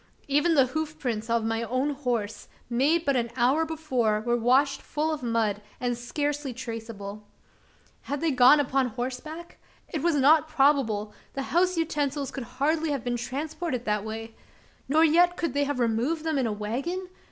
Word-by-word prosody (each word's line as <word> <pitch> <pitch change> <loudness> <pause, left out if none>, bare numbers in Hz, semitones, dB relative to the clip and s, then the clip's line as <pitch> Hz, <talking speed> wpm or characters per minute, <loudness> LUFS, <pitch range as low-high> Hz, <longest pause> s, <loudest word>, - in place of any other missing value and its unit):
Even 295 +4 +3
the 270 -3 +6
hoof 310 +3 -4
prints 230 -6 -3
of 230 -1 +1
my 225 0 0
own 255 +5 0
horse 245 -7 -3 0.2
made 300 +8 +2
but 280 - +2
an 235 -2 0
hour 260 +6 +3
before 260 -9 0
were 240 +2 0
washed 260 +4 +2
full 310 +1 -1
of 305 - -5
mud, 225 -4 0 0.2
and 245 -1 -1
scarcely 285 +2 -3
traceable. 225 -4 -6 0.9
Had 285 0 -1
they 330 0 +1
gone 260 +3 +7
upon 270 -2 +1
horseback? 260 +8 -6 0.3
It 310 - -3
was 340 0 +2
not 295 +3 +5
probable: 270 -9 +2 0.2
the 275 - -3
house 360 +1 +3
utensils 290 -4 -1
could 265 -3 -6
hardly 310 +3 +1
have 280 -5 -2
been 245 0 -1
transported 270 +2 -3
that 210 -1 0
way? 225 +1 -6 0.6
Nor 315 +3 +5
yet 350 +3 +4
could 335 - -2
they 285 0 +1
have 285 -1 -2
removed 245 +7 0
them 315 -3 0
in 255 - +1
a - - -1
wagon? 265 - -3
270 Hz, 175 wpm, -27 LUFS, 235-310 Hz, 0.9 s, gone